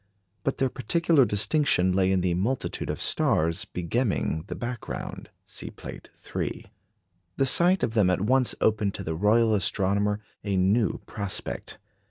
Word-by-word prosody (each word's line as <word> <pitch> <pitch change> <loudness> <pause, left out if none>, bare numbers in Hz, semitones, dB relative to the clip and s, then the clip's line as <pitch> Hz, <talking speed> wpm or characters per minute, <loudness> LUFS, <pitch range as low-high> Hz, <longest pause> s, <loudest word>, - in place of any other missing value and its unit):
But 135 - -1
their 135 -1 +1
particular 145 +3 +2
distinction 105 - +2
lay 95 0 +2
in 95 -1 +2
the 90 -1 +1
multitude 110 +9 -2
of - - -3
stars 85 +3 +1
begemming 90 -3 -1
the - - -5
background. 120 -1 -6 0.2
(See - - -8
Plate - - -10 0.3
III.) - - -3 0.7
The 135 - +3
sight 175 +8 +4
of 110 - 0
them 105 -5 +3
at 90 0 +1
once 125 +4 +2
opened 105 -2 +1
to 100 - -5
the 80 - -3
Royal 110 +6 +3
Astronomer 100 +1 +1 0.2
a 100 -2 -1
new 100 +5 +2
prospect. 100 -2 -4
105 Hz, 150 wpm, -26 LUFS, 95-125 Hz, 0.7 s, sight